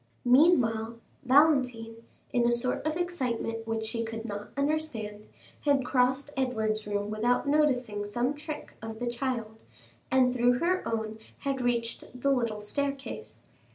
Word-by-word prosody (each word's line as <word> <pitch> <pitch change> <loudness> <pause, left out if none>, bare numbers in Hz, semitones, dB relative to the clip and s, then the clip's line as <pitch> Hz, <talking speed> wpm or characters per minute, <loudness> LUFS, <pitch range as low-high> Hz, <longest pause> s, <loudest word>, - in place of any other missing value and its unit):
Meanwhile, 245 -5 +4 0.3
Valentine, 255 -5 +3 0.4
in 240 -1 +3
a - - +3
sort 240 +1 0
of 310 +1 -1
excitement 245 -10 -2
which 225 -1 -1
she 230 +1 -2
could 225 0 -5
not 205 -2 -6
quite 280 - +1
understand, 230 -9 -2 0.4
had 280 -3 +3
crossed 260 +3 +2
Edward's 220 -5 -1
room 205 0 -2
without 240 +5 +1
noticing 255 -8 +2
some 240 +6 -1
trick 300 +1 -7
of 225 0 -6
the 245 - -3
child, 235 -3 -3 0.5
and 255 -1 +4
through 245 0 +4
her 350 +8 +1
own 220 -1 -2 0.2
had 275 -2 -1
reached 245 +1 -2
the 275 +2 +2
little 230 -5 0
staircase. 275 +5 -4
245 Hz, 145 wpm, -29 LUFS, 225-275 Hz, 0.5 s, Meanwhile